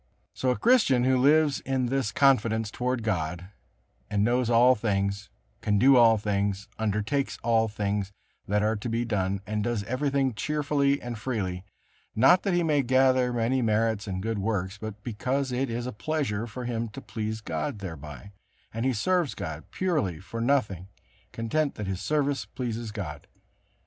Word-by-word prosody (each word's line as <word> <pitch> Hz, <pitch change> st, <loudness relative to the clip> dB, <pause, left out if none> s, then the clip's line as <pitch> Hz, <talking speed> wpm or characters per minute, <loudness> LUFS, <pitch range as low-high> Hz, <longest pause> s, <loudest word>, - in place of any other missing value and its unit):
So 130 Hz, -, -1 dB
a 125 Hz, -, +1 dB
Christian 215 Hz, -, +4 dB
who 130 Hz, +1 st, +3 dB
lives 145 Hz, +2 st, +4 dB
in 130 Hz, -1 st, -1 dB
this 130 Hz, -3 st, -1 dB
confidence 110 Hz, -5 st, +2 dB
toward 125 Hz, -1 st, -2 dB
God, 90 Hz, -3 st, -2 dB, 0.6 s
a 105 Hz, -, -2 dB
knows 120 Hz, +3 st, +2 dB
all 120 Hz, +2 st, +6 dB
things, 100 Hz, -3 st, -1 dB, 0.3 s
can 105 Hz, -1 st, +1 dB
do 135 Hz, +6 st, +6 dB
all 115 Hz, -2 st, +6 dB
things, 100 Hz, -1 st, -1 dB
undertakes 110 Hz, +6 st, -1 dB
all 115 Hz, -1 st, +3 dB
things 100 Hz, -1 st, -2 dB, 0.4 s
that 105 Hz, +1 st, +1 dB
are 110 Hz, +1 st, +1 dB
to 110 Hz, +3 st, -4 dB
be 115 Hz, +1 st, -1 dB
done, 100 Hz, -3 st, -1 dB
and 105 Hz, +1 st, -2 dB
does 115 Hz, -2 st, -1 dB
everything 135 Hz, +2 st, 0 dB
cheerfully 140 Hz, +3 st, 0 dB
and 120 Hz, -2 st, -6 dB
freely; 95 Hz, -7 st, -3 dB, 0.5 s
not 135 Hz, +11 st, +6 dB
that 195 Hz, -3 st, 0 dB
he 175 Hz, -, +2 dB
may 150 Hz, -3 st, +2 dB
gather 130 Hz, 0 st, +3 dB
many 120 Hz, +2 st, +1 dB
merits 110 Hz, -2 st, +1 dB
and 95 Hz, -1 st, -3 dB
good 110 Hz, -1 st, -2 dB
works, 100 Hz, -1 st, -2 dB
but 110 Hz, -1 st, -7 dB
because 130 Hz, +4 st, -2 dB
it 130 Hz, +1 st, -1 dB
is 120 Hz, +1 st, -3 dB
a 125 Hz, -, -3 dB
pleasure 115 Hz, -4 st, -2 dB
for 125 Hz, +2 st, -7 dB
him 115 Hz, -1 st, -2 dB
to 110 Hz, -, -9 dB
please 110 Hz, -1 st, -4 dB
God 80 Hz, -2 st, -3 dB
thereby, 80 Hz, 0 st, -8 dB, 0.4 s
and 115 Hz, +3 st, -1 dB
he 130 Hz, -, +2 dB
serves 175 Hz, -, 0 dB
God 80 Hz, -2 st, -6 dB
purely 150 Hz, -, -1 dB
for 115 Hz, +5 st, -6 dB
nothing, 105 Hz, -9 st, 0 dB, 0.4 s
content 140 Hz, +6 st, -1 dB
that 105 Hz, -, -5 dB
his 95 Hz, -1 st, -3 dB
service 145 Hz, +2 st, 0 dB
pleases 120 Hz, -3 st, -5 dB
God. 85 Hz, -9 st, -6 dB
115 Hz, 170 wpm, -27 LUFS, 105-130 Hz, 0.6 s, all